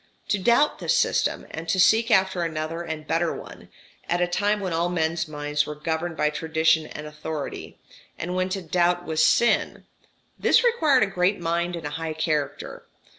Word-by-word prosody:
To 205 - +1
doubt 240 +9 +3
this - - +1
system, - - +1
and 160 0 -7
to 185 - +1
seek 220 +5 +4
after 190 -4 +3
another 165 0 -3
and 160 -2 -6
better 165 +2 0
one, - - -11 0.4
at 175 - +1
a 175 - +3
time 205 +4 0
when 185 -4 -3
all 170 +2 0
men's 160 -1 -1
minds 150 -1 -2
were 150 - -5
governed 160 +2 -3
by 150 0 +1
tradition 160 0 +1
and 150 - -8
authority, 150 0 -6 0.4
and 175 +2 -4
when 185 0 0
to 190 0 -3
doubt 175 +1 +1
was 155 -1 +1
sin 235 +9 +2 0.5
this 450 - +4
required 315 - +3
a - - +4
great 195 0 0
mind 170 +1 -1
and 165 -2 -7
a 145 - -4
high 160 -1 -3
character. 155 -3 -3
170 Hz, 180 wpm, -24 LUFS, 160-185 Hz, 0.5 s, seek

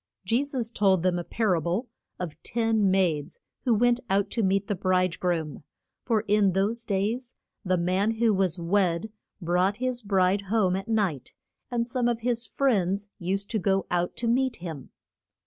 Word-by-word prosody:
Je 230 +8 +2
sus 255 -5 -3
told 190 -5 +2
them 180 -1 +1
a - - -4
par 215 +1 0
a 165 - +1
ble 180 - -1 0.3
of 165 -3 -6
ten 225 -3 +1
maids 175 -6 +1 0.3
who 240 -3 +4
went 240 +2 +3
out 200 +1 +1
to 230 - 0
meet 195 0 +1
the 205 - -1
bride 185 -2 +1
groom. 160 -6 -2 0.4
For 225 -4 +1
in 205 -2 +2
those 210 +5 0
days 225 +5 -2 0.3
the 185 -2 +1
man 185 +5 +1
who 225 -1 +3
was 190 -3 +1
wed 180 +2 0 0.3
brought 180 +3 +1
his 255 0 -2
bride 195 -1 +2
home 200 -4 +2
at 195 +3 -4
night, 195 - -1 0.4
and 240 -2 0
some 245 0 -1
of 235 -1 -1
his 235 0 -1
friends 200 -6 0
used 195 +2 -2
to 220 - 0
go 195 0 +1
out 175 0 0
to 235 - -2
meet 255 +1 +2
him. 160 - -8
200 Hz, 180 wpm, -27 LUFS, 180-230 Hz, 0.4 s, who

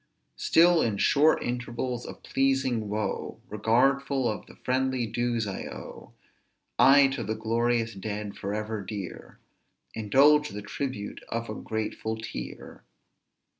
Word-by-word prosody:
100 - - -15
"Still 170 0 +5
in 110 -3 0
short 150 +9 +4
intervals 125 0 -3
of - - -10
pleasing 135 -5 +1
woe, 105 -1 -3
Regardful 130 +5 +2
of 110 - -3
the - - -14
friendly 130 -1 0
dues 120 0 -1
I 100 -2 -5
owe, - - -10 0.7
I 140 +1 +8
to 135 -2 -3
the 110 +1 -2
glorious 115 +1 0
dead, 105 +1 -5
forever 105 +2 -3
dear, 100 -1 -7 0.6
Indulge 140 +8 +4
the 105 0 -7
tribute 105 -1 -5
of 115 0 -3
a - - -3
grateful 110 0 -3
tear." 110 - -8
115 Hz, 130 wpm, -27 LUFS, 110-130 Hz, 0.7 s, I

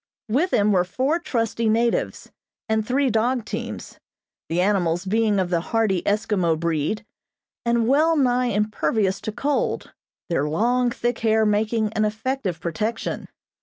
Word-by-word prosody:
With 290 +12 +1
him 205 0 +3
were 185 -3 +3
four 260 - 0
trusty 230 - -1
natives, 230 +2 0 0.4
and 220 0 +1
three 260 +3 +1
dog 235 +2 +1
teams, - - -6 0.5
the 170 - 0
animals 180 -2 +1
being 215 +1 +2
of 185 -2 0
the 170 - +2
hardy 215 -2 0
Eskimo 200 -6 +1
breed, 170 +6 -1 0.6
and 235 -1 +2
well 310 +5 +4
nigh 250 -2 +2
impervious 210 -2 0
to 215 - -4
cold, 280 +6 -1 0.3
their 150 -3 0
long, 245 +9 +2
thick 240 0 -2
hair 220 -1 +3
making 215 +1 +1
an 220 -1 +1
effective 215 -3 -2
protection. 220 +6 -3
220 Hz, 140 wpm, -23 LUFS, 195-240 Hz, 0.6 s, well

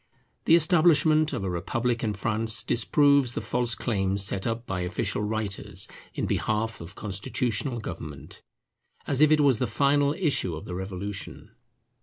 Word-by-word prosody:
The 165 - +6
establishment 155 -2 +4
of 125 -8 -3
a 95 - -2
republic 115 +7 -2
in 105 -2 -1
France 110 +3 +2
disproves 140 +1 +3
the - - -1
false 120 -1 -1
claims 100 -3 0
set 95 +2 -1
up 115 +1 -3
by 95 -4 -3
official 90 +3 -2
writers 105 -1 -2 0.3
in - - -2
behalf 110 0 -2
of 85 +4 -10
constitutional 110 +5 -1
government, 75 -8 -8 0.6
as 140 0 0
if 155 - +6
it 155 -1 +4
was 135 -6 +3
the 125 - 0
final 140 +5 +2
issue 145 - 0
of 80 - -8
the 90 - -7
Revolution. 95 +2 -6
115 Hz, 155 wpm, -26 LUFS, 95-140 Hz, 0.6 s, The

